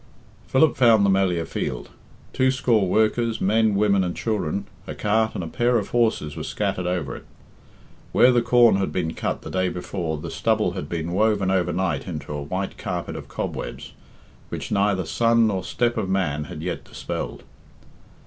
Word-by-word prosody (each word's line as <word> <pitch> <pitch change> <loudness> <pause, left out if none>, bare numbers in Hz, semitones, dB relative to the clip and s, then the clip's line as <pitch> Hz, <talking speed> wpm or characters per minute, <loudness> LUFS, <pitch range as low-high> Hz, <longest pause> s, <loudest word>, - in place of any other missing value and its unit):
Philip 145 +3 +3
found 115 -5 +5
the 100 - +4
Melliah 90 -4 +1
field. - - -4 0.4
Two 130 0 +3
score 120 -6 +2
workers, 110 +3 +1
men, 110 +1 +2
women, 100 -1 +3
and 90 -1 -2
children, 100 -4 -2 0.2
a - - -5
cart 110 +1 +1
and 90 - -3
a - - -5
pair 120 +7 +1
of 105 - -3
horses 110 -11 +1
were - - -5
scattered 90 -1 -2
over 90 -6 -2
it. - - -11 0.9
Where 125 - +6
the 120 -1 +3
corn 120 -3 +5
had 95 - -1
been 80 -3 -2
cut - - -3
the - - -7
day 95 0 +1
before 90 -3 -4
the 75 - -6
stubble - - +1
had 75 - -6
been 85 0 -3
woven 100 0 +2
overnight 90 0 0
into 75 -4 -5
a 75 - -4
white 95 +7 -4
carpet - - -4
of - - -7
cobwebs, - - -5 0.6
which - - -5
neither 100 -3 +1
sun 115 +6 +3
nor 100 -4 0
step 120 -1 0
of 95 - -1
man 75 -6 0
had 80 -1 -8
yet 90 0 -3
dispelled. - - -6
95 Hz, 175 wpm, -23 LUFS, 90-110 Hz, 0.9 s, Where